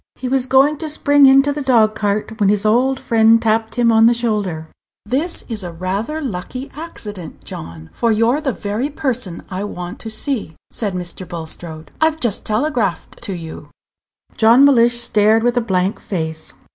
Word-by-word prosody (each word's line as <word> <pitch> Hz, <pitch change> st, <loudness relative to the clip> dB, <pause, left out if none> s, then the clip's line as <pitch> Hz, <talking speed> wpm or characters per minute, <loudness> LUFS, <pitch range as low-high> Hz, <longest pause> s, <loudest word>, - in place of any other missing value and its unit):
He 255 Hz, -, -5 dB
was 260 Hz, 0 st, +1 dB
going 275 Hz, +3 st, +3 dB
to 315 Hz, -, -4 dB
spring 285 Hz, -2 st, +4 dB
into 275 Hz, +2 st, +5 dB
the 295 Hz, -, -4 dB
dog 230 Hz, -5 st, +3 dB
cart 215 Hz, +1 st, -2 dB
when 200 Hz, -2 st, +3 dB
his 210 Hz, 0 st, +1 dB
old 255 Hz, +5 st, +2 dB
friend 225 Hz, 0 st, +4 dB
tapped 220 Hz, 0 st, 0 dB
him 240 Hz, -1 st, +3 dB
on 225 Hz, 0 st, +5 dB
the 240 Hz, -, +3 dB
shoulder. 205 Hz, -9 st, -2 dB, 0.4 s
"This 285 Hz, +10 st, -2 dB
is 220 Hz, -5 st, -3 dB
rather 185 Hz, -, -4 dB
a -, -, -4 dB
lucky 255 Hz, +4 st, -6 dB
accident, 210 Hz, -, -8 dB
John, 80 Hz, -1 st, -9 dB
for 235 Hz, -1 st, 0 dB
you're 230 Hz, +7 st, +2 dB
the 280 Hz, -3 st, -1 dB
very 215 Hz, +5 st, -3 dB
person 255 Hz, -, -3 dB
I 185 Hz, +2 st, -3 dB
want 180 Hz, +1 st, -7 dB
to 225 Hz, -, -7 dB
see," 220 Hz, -, -3 dB, 0.2 s
said 205 Hz, -5 st, -3 dB
Mr. 180 Hz, +1 st, -6 dB
Bulstrode. 160 Hz, -1 st, -6 dB
"I've 315 Hz, 0 st, +2 dB
just 235 Hz, -7 st, 0 dB
telegraphed 220 Hz, -, -2 dB
to 195 Hz, -, -5 dB
you." 165 Hz, -3 st, -9 dB, 0.7 s
John 235 Hz, +5 st, +6 dB
Mellish 240 Hz, -3 st, +4 dB
stared 220 Hz, -1 st, +3 dB
with 245 Hz, 0 st, +1 dB
a 245 Hz, -, +2 dB
blank 190 Hz, -2 st, -1 dB
face. 160 Hz, -4 st, -4 dB
225 Hz, 175 wpm, -18 LUFS, 190-260 Hz, 0.7 s, John